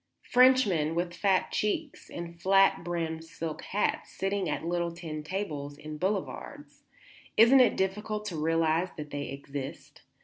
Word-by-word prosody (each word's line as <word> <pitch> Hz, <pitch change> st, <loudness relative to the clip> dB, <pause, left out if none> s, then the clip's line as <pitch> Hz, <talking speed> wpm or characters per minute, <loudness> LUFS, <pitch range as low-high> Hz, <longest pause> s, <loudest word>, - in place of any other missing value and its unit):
Frenchmen 230 Hz, -12 st, +4 dB
with 175 Hz, 0 st, -1 dB
fat 190 Hz, +1 st, +1 dB
cheeks 285 Hz, +8 st, -2 dB
and 170 Hz, 0 st, -8 dB
flat 195 Hz, 0 st, +4 dB
brimmed 165 Hz, -2 st, -3 dB
silk 165 Hz, -1 st, -6 dB
hats 205 Hz, -, -1 dB
sitting 195 Hz, -2 st, -1 dB
at 150 Hz, -, -3 dB
little 170 Hz, 0 st, -1 dB
tin 165 Hz, -2 st, -6 dB
tables 150 Hz, -5 st, -4 dB
in 155 Hz, 0 st, -8 dB
boulevards; 195 Hz, +2 st, -4 dB, 0.6 s
isn't 235 Hz, +5 st, +8 dB
it 250 Hz, -, +4 dB
difficult 210 Hz, +2 st, -2 dB
to 190 Hz, -5 st, -4 dB
realize 165 Hz, +2 st, +1 dB
that 150 Hz, -1 st, -7 dB
they 145 Hz, 0 st, -4 dB
exist? 140 Hz, 0 st, -7 dB
170 Hz, 140 wpm, -29 LUFS, 155-200 Hz, 0.6 s, isn't